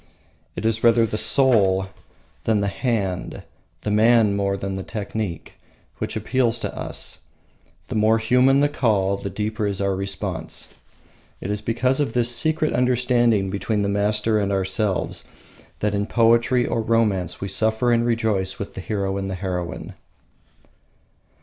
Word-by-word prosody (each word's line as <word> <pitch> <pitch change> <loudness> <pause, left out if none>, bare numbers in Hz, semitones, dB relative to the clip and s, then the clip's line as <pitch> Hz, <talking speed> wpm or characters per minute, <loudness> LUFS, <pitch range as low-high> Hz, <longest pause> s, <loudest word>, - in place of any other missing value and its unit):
It - - -5
is 115 0 0
rather 115 -1 +5
the 110 - -4
soul 105 -5 +3 0.6
than 110 -2 +2
the 100 - 0
hand, 100 -5 -2 0.4
the 105 - -1
man 110 -1 +4
than 100 -1 -1
the 95 - -4
technique, 105 -3 -5 0.4
which - - -3
appeals 125 -3 0
to - - -4
us, - - -4 0.7
the - - -5
more 110 +1 +3
human 125 +4 +3
the 145 - +4
call 105 -9 +1
the 100 0 -5
deeper 105 +1 -2
is 100 -1 -2
our 100 -1 0
response. 95 -3 -4 0.7
It 100 - -4
is 105 0 -2
because 125 +5 0
of 140 -6 0
this 120 0 +1
secret 155 +1 +1
understanding 120 -5 +2
between 100 +2 -1
the 100 - 0
master 105 +2 +1
and 100 -1 -1
ourselves 95 0 -1 0.6
that 105 -1 0
in 100 0 -1
poetry 120 +1 +3
or 115 - -1
romance 105 -6 0
we 100 - -4
suffer 110 +4 +1
and 115 0 +3
rejoice 110 -5 0
with 100 - -6
the 95 - -6
hero 100 -1 -2
and 95 0 -3
heroine. 90 -2 -4
105 Hz, 150 wpm, -22 LUFS, 100-115 Hz, 0.7 s, rather